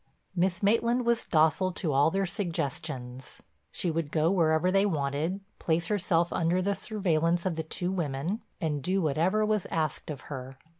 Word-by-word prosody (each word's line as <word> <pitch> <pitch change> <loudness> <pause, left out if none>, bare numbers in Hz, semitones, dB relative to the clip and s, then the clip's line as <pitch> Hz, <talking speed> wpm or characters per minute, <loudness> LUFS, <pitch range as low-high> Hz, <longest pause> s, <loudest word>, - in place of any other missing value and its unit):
Miss 180 +1 0
Maitland 235 +4 +2
was 235 -1 +2
docile 160 +4 +3
to 160 -5 -1
all 140 +3 +5
their 195 +3 0
suggestions. 135 - -4 0.3
She 175 - -1
would 160 -2 -2
go 160 +2 +2
wherever 165 -1 +3
they 195 +1 +4
wanted, 160 +1 -1 0.2
place 165 0 +1
herself 175 -4 +1
under 175 +1 +1
the 200 +2 +1
surveillance 175 -4 0
of 185 -3 0
the 160 - -1
two 175 +3 -3
women, 170 - -2 0.2
and 150 -5 -1
do 185 +7 +1
whatever 175 +7 +2
was 215 -3 0
asked 155 -2 -2
of 145 -2 -5
her. 135 -1 -7
170 Hz, 165 wpm, -29 LUFS, 155-190 Hz, 0.3 s, all